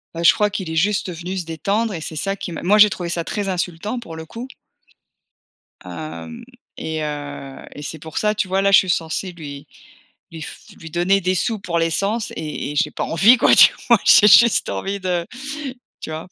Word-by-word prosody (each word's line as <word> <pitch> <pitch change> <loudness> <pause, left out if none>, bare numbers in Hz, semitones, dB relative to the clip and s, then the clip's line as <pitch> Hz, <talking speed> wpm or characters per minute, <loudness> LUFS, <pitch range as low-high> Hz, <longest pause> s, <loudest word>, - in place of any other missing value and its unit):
Bah, 170 - -4
je - - +7
crois 210 0 +1
qu'il 190 -5 -5
est - - -4
juste 195 +2 0
venu 180 +3 -6
se 175 - -4
détendre 200 +8 -1
et 165 - -5
c'est 160 - -6
ça 195 +5 -2
qui 185 - -7
m 165 - -6
moi 205 +4 +4
j'ai 210 0 +8
trouvé 175 -3 -5
ça 170 -1 -2
très 205 +3 -3
insultant, 185 +5 -3
pour 165 -8 -10
le 160 0 -8
coup! 235 +9 -8 1.4
Hem 80 -2 -8 0.3
et 160 0 -4
heu 145 -2 -7
et 145 - -8
c'est 155 +1 -7
pour 160 +1 -9
ça, 210 0 +1
tu 200 - -1
vois, 190 +1 0
là, 200 0 +2
je - - +9
suis 185 - -2
censée 170 +2 -2
lui 145 -4 -10 0.6
lui 165 -1 -9
f - - -9 0.2
lui 165 - -10
donner 175 +4 +2
des 185 0 0
sous 220 +3 -1
pour 175 -3 -3
l'essence, 200 +7 -1
et 150 -2 -5
et - - -7
j'ai - - +1
pas - - -4
envie, 210 +10 +5
quoi, - - +4
tu - - +8
vois? - - +5
J'ai 210 - +7
juste 235 +3 +6
envie 195 - -3
de, 180 -2 -2 0.7
tu - - -7
vois? 160 +2 -6
175 Hz, 215 wpm, -20 LUFS, 160-200 Hz, 1.4 s, je